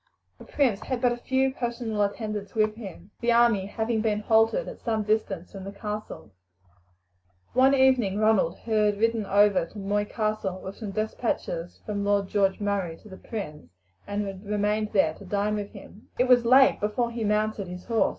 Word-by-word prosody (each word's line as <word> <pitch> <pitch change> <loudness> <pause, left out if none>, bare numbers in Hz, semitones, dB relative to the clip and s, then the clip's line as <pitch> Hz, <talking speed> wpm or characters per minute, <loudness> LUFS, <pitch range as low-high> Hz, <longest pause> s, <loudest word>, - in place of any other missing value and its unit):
The - - -12
prince 250 -9 +1
had 255 -2 -3
but 245 0 +3
a 240 - -2
few 265 +2 0
personal 235 -4 -3
attendants 205 0 -3
with 215 -1 +2
him, 200 -3 -10
the 240 0 +2
army 235 -5 +4
having 220 +2 -1
been 215 -1 0
halted 225 - +3
at - - -9
some 220 -2 -1
distance 205 -4 -1
from 195 -1 -8
the 195 - -6
castle. 210 - -6 1.2
One 265 +2 +5
evening 255 -7 +3
Ronald 215 -6 +2
had 210 -2 +1
ridden 225 -1 +1
over 200 -3 +4
to 210 - -14
Moy 205 +1 -1
Castle 215 -4 -2
with 190 +1 -8
some 215 -3 -6
despatches 200 -5 -3
from 205 -1 -2
Lord 200 -1 +1
George 195 -2 +1
Murray 200 -5 -2
to 215 - -13
the 190 - -10
prince, 170 -11 -7 0.4
and 205 0 -2
had 195 0 -7
remained 210 +1 0
there 160 -6 +3
to 200 - -13
dine 205 +2 -1
with 205 -1 -3
him. 210 - -14
It 250 - +2
was 245 -2 +5
late 265 +3 +6
before 225 +3 -1
he 235 -1 -4
mounted 210 -1 0
his 180 0 -8
horse. 230 -2 +2
210 Hz, 185 wpm, -26 LUFS, 200-230 Hz, 1.2 s, late